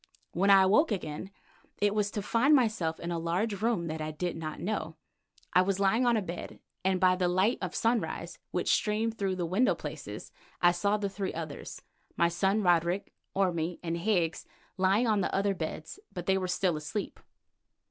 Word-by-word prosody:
When 195 Hz, +4 st, +1 dB
I 195 Hz, -1 st, +8 dB
awoke 220 Hz, -, +4 dB
again 180 Hz, -2 st, -4 dB, 0.5 s
it 205 Hz, 0 st, +2 dB
was 210 Hz, -1 st, +1 dB
to 205 Hz, -1 st, -4 dB
find 245 Hz, +8 st, +4 dB
myself 215 Hz, -, +1 dB
in 170 Hz, +1 st, -4 dB
a 170 Hz, -, -1 dB
large 190 Hz, +5 st, -1 dB
room 220 Hz, -6 st, +1 dB
that 160 Hz, -1 st, -4 dB
I 155 Hz, -, -3 dB
did 170 Hz, +3 st, -3 dB
not 155 Hz, -1 st, -5 dB
know. 180 Hz, -5 st, -3 dB, 0.6 s
I 180 Hz, -, +6 dB
was 195 Hz, +1 st, 0 dB
lying 220 Hz, +6 st, +3 dB
on 235 Hz, -1 st, +4 dB
a 210 Hz, -, -1 dB
bed, 170 Hz, -1 st, -7 dB, 0.2 s
and 190 Hz, 0 st, +2 dB
by 185 Hz, -1 st, +4 dB
the 180 Hz, -1 st, +1 dB
light 190 Hz, +6 st, +2 dB
of -, -, -4 dB
sunrise 230 Hz, 0 st, -1 dB
which -, -, +1 dB
streamed 225 Hz, +1 st, 0 dB
through 195 Hz, -2 st, 0 dB
the 180 Hz, -2 st, -2 dB
window 205 Hz, +10 st, +2 dB
places -, -, -7 dB, 0.3 s
I 175 Hz, -, +5 dB
saw 200 Hz, +4 st, +1 dB
the 205 Hz, -1 st, -2 dB
three 195 Hz, 0 st, -4 dB
others, 160 Hz, -3 st, -7 dB, 0.3 s
my 170 Hz, -, +4 dB
son 195 Hz, +4 st, +1 dB
Roderick, 175 Hz, +1 st, +1 dB, 0.2 s
Orme 175 Hz, -3 st, 0 dB
and 165 Hz, -1 st, -2 dB
Higgs 170 Hz, -3 st, 0 dB, 0.3 s
lying 195 Hz, +5 st, +3 dB
on 215 Hz, -3 st, +2 dB
the -, -, -1 dB
other 200 Hz, 0 st, +2 dB
beds, 160 Hz, -, -6 dB
but 175 Hz, -1 st, -6 dB
they 190 Hz, -, +3 dB
were 185 Hz, -, -2 dB
still 180 Hz, -1 st, +1 dB
asleep. 155 Hz, +7 st, -4 dB
190 Hz, 190 wpm, -30 LUFS, 170-210 Hz, 0.6 s, I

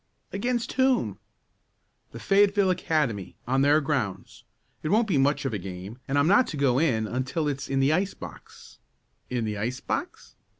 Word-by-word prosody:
"Against 240 Hz, +3 st, -1 dB
whom?" 260 Hz, -1 st, +1 dB, 0.9 s
"The -, -, -9 dB
Fayetteville 200 Hz, -1 st, +3 dB
Academy, 150 Hz, -, -1 dB
on 135 Hz, +2 st, +2 dB
their 145 Hz, +2 st, +5 dB
grounds. 135 Hz, -10 st, -3 dB, 0.4 s
It 155 Hz, -, -3 dB
won't 220 Hz, +3 st, +3 dB
be 165 Hz, -9 st, +2 dB
much 140 Hz, +1 st, +2 dB
of 130 Hz, -, -1 dB
a 105 Hz, -, -2 dB
game, 95 Hz, +5 st, -8 dB
and 135 Hz, -, 0 dB
I'm 145 Hz, -, +4 dB
not 205 Hz, +9 st, +5 dB
to 155 Hz, -, -5 dB
go 135 Hz, -2 st, +2 dB
in 120 Hz, -9 st, +1 dB
until 130 Hz, +7 st, -2 dB
it's 140 Hz, -1 st, -3 dB
in 135 Hz, 0 st, +1 dB
the 140 Hz, +3 st, +3 dB
ice 190 Hz, +4 st, 0 dB
box -, -, -12 dB, 0.3 s
" -, -, -45 dB
"In 120 Hz, -2 st, -1 dB
the 105 Hz, -1 st, -3 dB
ice 125 Hz, +5 st, -2 dB
box?" -, -, -5 dB
140 Hz, 180 wpm, -26 LUFS, 125-185 Hz, 0.9 s, their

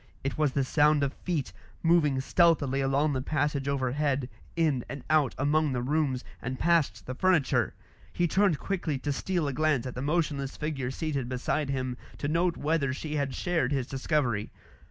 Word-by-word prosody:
It 135 Hz, -, -2 dB
was 150 Hz, -3 st, +1 dB
the 140 Hz, -, +1 dB
sound 150 Hz, +2 st, +3 dB
of 140 Hz, 0 st, -1 dB
feet, 165 Hz, -7 st, -3 dB, 0.3 s
moving 160 Hz, -5 st, +3 dB
stealthily 145 Hz, -3 st, +3 dB
along 140 Hz, +2 st, +2 dB
the 130 Hz, -, -1 dB
passage 145 Hz, -1 st, -1 dB
overhead, 140 Hz, 0 st, 0 dB, 0.3 s
in 155 Hz, -7 st, +1 dB
and 140 Hz, -2 st, -6 dB
out 155 Hz, -4 st, +3 dB
among 145 Hz, +1 st, +2 dB
the 125 Hz, -, -1 dB
rooms, 140 Hz, -2 st, 0 dB, 0.2 s
and 130 Hz, +1 st, -4 dB
past 170 Hz, -2 st, +1 dB
the 130 Hz, -, -4 dB
furniture. 170 Hz, -1 st, +2 dB, 0.4 s
He 175 Hz, -, +1 dB
turned 190 Hz, -2 st, +3 dB
quickly 175 Hz, -6 st, -2 dB
to 145 Hz, +2 st, -2 dB
steal 175 Hz, +1 st, -1 dB
a 140 Hz, -, -2 dB
glance 150 Hz, -3 st, +1 dB
at 125 Hz, -, -4 dB
the 125 Hz, -, -5 dB
motionless 145 Hz, -2 st, -1 dB
figure 145 Hz, -5 st, -2 dB
seated 135 Hz, -2 st, -3 dB
beside 135 Hz, +3 st, -1 dB
him, 130 Hz, -2 st, -2 dB, 0.2 s
to 145 Hz, -, -3 dB
note 170 Hz, +3 st, +1 dB
whether 145 Hz, -2 st, +1 dB
she 150 Hz, +2 st, -4 dB
had 140 Hz, -3 st, -1 dB
shared 165 Hz, -7 st, 0 dB
his 135 Hz, -3 st, 0 dB
discovery. 130 Hz, -5 st, -1 dB
145 Hz, 175 wpm, -28 LUFS, 130-155 Hz, 0.4 s, sound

